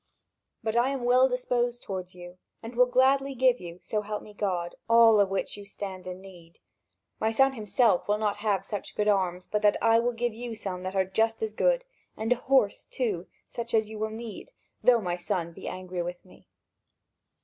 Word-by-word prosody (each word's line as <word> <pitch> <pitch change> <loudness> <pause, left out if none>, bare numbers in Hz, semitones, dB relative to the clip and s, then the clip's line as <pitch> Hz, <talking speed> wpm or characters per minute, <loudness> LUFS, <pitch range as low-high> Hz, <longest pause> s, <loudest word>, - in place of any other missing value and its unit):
But 220 0 -1
I 240 +2 +3
am 270 -3 -3
well 255 +2 +5
disposed 245 -1 -1
toward 185 -2 -6
you, 175 0 -11 0.2
and 230 +2 -8
will 250 +1 +5
gladly 270 +2 +3
give 255 -1 +3
you, 175 0 -9
so 215 - -1
help 210 0 -5
me 210 - -13
God, 180 -4 -2 0.2
all 230 -2 +7
of 200 -1 +4
which 195 0 -2
you 205 - -9
stand 195 -2 -7
in 180 0 -6
need. 175 -4 -15 0.6
My 220 - +1
son 270 +4 +3
himself 215 -3 +2
will 210 +1 +2
not 210 -1 -1
have 205 -2 0
such 205 -2 -6
good 210 - 0
arms 185 -3 +1
but 210 - -1
that 210 -1 +4
I 225 0 +4
will 240 +1 0
give 235 0 -1
you 235 0 -6
some 190 -4 -4
that 185 +1 -5
are 190 -1 +3
just 225 +4 0
as 215 -1 -2
good, - - +2 0.3
and 220 +2 -2
a - - -7
horse, 255 -4 +1
too, 200 -9 -2 0.2
such 235 0 -4
as 220 -1 +2
you 215 - -7
will 220 0 -1
need, 225 - -8 0.3
though 240 -2 +5
my 175 -2 -2
son 175 -1 -2
will - - -16
be - - -9
angry 185 -1 -4
with 175 +1 -6
me. 185 - -19
215 Hz, 210 wpm, -28 LUFS, 190-240 Hz, 0.6 s, all